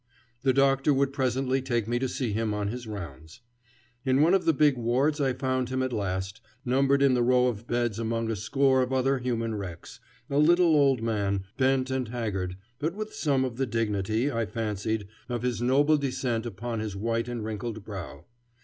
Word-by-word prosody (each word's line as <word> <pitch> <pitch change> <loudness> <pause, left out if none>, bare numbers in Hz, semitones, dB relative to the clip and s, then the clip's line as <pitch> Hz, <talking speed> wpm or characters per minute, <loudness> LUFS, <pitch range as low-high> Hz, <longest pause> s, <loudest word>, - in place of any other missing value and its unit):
The 135 - +3
doctor 135 +1 +3
would 135 0 +1
presently 130 -1 0
take 120 -4 -1
me 120 +1 0
to 130 0 -1
see 125 -4 -2
him 110 0 -1
on 105 -1 -1
his 120 +1 -6
rounds. 85 - -8 0.6
In 130 0 +3
one 170 +4 +4
of 195 - +2
the 165 - +5
big 150 -1 +3
wards 130 +6 +1
I 135 -2 +2
found 130 -1 -1
him 130 0 -1
at 130 -1 -2
last, 95 -1 -3 0.2
numbered 135 +2 +3
in 135 -2 +5
the 125 - +2
row 125 +1 +4
of 115 -2 -2
beds 120 -2 -1
among 115 0 -1
a - - -1
score 135 +5 +2
of 125 0 -1
other 130 +1 +2
human 115 -2 -2
wrecks, 95 -5 -7 0.3
a 140 - 0
little 170 +1 +5
old 135 -5 +3
man, 100 -4 0
bent 130 0 +1
and 130 -2 -1
haggard, 100 -6 -3 0.2
but 160 +5 -2
with 215 +1 -5
some 135 -4 +1
of 120 -2 -5
the 135 0 0
dignity, 110 +3 0
I 115 -3 -1
fancied, 110 -1 -2 0.2
of 120 -1 -3
his 125 -2 -1
noble 145 +5 +4
descent 130 -4 -2
upon 115 0 -4
his 110 -2 -4
white 115 +3 -1
and 120 -3 -4
wrinkled 110 0 -5
brow. 95 -5 -8
120 Hz, 195 wpm, -27 LUFS, 110-135 Hz, 0.6 s, the